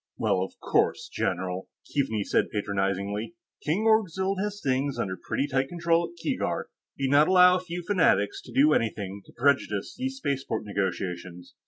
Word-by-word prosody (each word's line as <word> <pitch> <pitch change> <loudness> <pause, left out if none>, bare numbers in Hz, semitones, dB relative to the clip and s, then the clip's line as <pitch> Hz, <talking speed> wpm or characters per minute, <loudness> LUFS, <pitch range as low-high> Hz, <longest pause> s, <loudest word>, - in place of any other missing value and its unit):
"Well, 95 - +1
of 95 - -5
course, - - +1
general," 95 0 -2 0.2
Keaveney 110 -8 0
said - - +1
patronizingly. 100 - -2 0.3
"King 165 +8 0
Orgzild 195 -3 +2
has 205 0 -3
things 135 -2 0
under 95 -1 -2
pretty 95 +9 -2
tight 135 -1 0
control 170 0 +1
at - - -17
Keegark. 165 - -2 0.3
He'd 135 -1 0
not 145 +2 +6
allow 180 -1 +7
a - - -2
few 180 -1 -6
fanatics 165 - +2
to - - -11
do 150 +3 +5
anything 100 -5 -1
to - - -15
prejudice 120 -6 +1
these 265 +1 -3
spaceport 135 - -2
negotiations." 90 -3 -4
135 Hz, 160 wpm, -27 LUFS, -, 0.3 s, allow